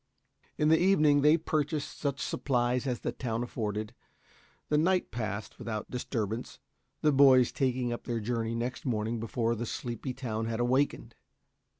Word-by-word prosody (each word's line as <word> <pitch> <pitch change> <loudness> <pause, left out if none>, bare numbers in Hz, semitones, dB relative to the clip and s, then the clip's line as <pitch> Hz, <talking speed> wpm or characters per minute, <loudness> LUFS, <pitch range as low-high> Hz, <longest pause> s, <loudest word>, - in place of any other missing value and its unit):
In 150 - +3
the 160 - +5
evening, 155 -6 +4
they 150 +3 +6
purchased 155 -2 -2
such 140 -2 -1
supplies 125 0 0
as 125 -2 -2
the - - -2
town 115 -2 -3
afforded. 110 -2 -3 0.8
The 150 - +3
night 180 +3 +2
passed 105 -2 -4
with - - -8
out 110 -1 -4
disturbance, 115 -2 -3 0.5
the 150 - +5
boys 135 -3 +6
taking 125 -3 0
up 120 - -7
their 120 -1 -1
journey 115 +1 -2
next 120 +2 -3
morning 115 -2 -1
before 115 +1 -1
the 120 +1 -4
sleepy 120 +2 -4
town 115 -4 -3
had 115 0 -2
awakened. 130 +4 +1
125 Hz, 160 wpm, -30 LUFS, 115-140 Hz, 0.8 s, they